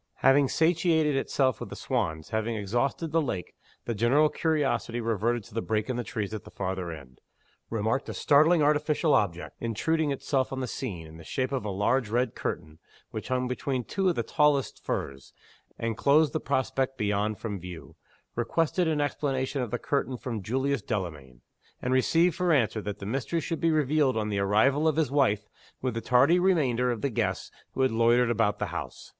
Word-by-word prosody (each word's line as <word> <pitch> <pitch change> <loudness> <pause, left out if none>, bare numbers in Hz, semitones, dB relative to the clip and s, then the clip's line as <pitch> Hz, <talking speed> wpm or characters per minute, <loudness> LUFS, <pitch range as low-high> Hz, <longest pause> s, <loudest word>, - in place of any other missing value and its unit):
Having 135 0 +5
satiated 160 -2 +2
itself 130 -3 +1
with - - -6
the - - -7
swans, 80 -1 -2
having 110 +1 -1
exhausted 120 - -1
the 165 +1 +3
lake, 95 - -4 0.3
the 120 - -1
general 125 +8 +3
curiosity 145 -8 0
reverted 115 0 0
to - - -16
the 115 - -1
break 110 +2 -1
in - - -3
the 120 - -2
trees 105 -2 -4
at 110 - -5
the - - -12
farther 95 -2 -3
end 70 -5 -11 0.5
remarked 115 +4 -1
a - - -5
startlingly 155 +2 +4
artificial 150 +1 +2
object, 90 -4 0
intruding 150 +8 0
itself 135 -1 -1
on 135 - -3
the 130 - -1
scene, 100 -10 -5
in 80 +1 -12
the 80 - -11
shape 130 - -2
of 135 -5 -1
a 105 - -3
large 105 +5 +1
red 120 +1 0
curtain, 75 +1 -5 0.3
which 110 - -6
hung 125 -1 0
between 125 0 -2
two 190 - 0
of 175 - 0
the - - -1
tallest 150 -6 +1
firs, 70 0 -4 0.4
and 115 -1 -2
closed 145 0 +4
the - - 0
prospect 135 0 -1
beyond 105 0 0
from 105 -4 -5
view 90 -1 -10 0.4
requested 165 +8 +1
an 155 -2 +1
explanation 135 -1 -1
of 125 - -3
the - - -1
curtain 135 -3 -1
from 120 -5 -4
Julius 130 +7 -1
Delamayn 75 - -5 0.4
and 125 - -1
received 165 +7 +3
for 180 -1 +1
answer 115 -7 +2
that 100 -1 -5
the 100 - -8
mystery 135 +9 -1
should 165 +1 -4
be 165 - +3
revealed 150 -4 +2
on 105 -1 -1
the 100 -1 -1
arrival 110 +10 +3
of 155 - +2
his 155 -5 +1
wife 110 -8 +2 0.3
with 130 -2 -2
the 115 - -3
tardy 140 +10 +4
remainder 135 -10 +2
of 120 -3 -2
the 140 - -1
guests - - -2 0.2
who 135 - 0
had 130 - +3
loitered 115 +1 +3
about 105 -3 +1
the - - -1
house. - - -6
125 Hz, 195 wpm, -28 LUFS, 105-145 Hz, 0.5 s, Having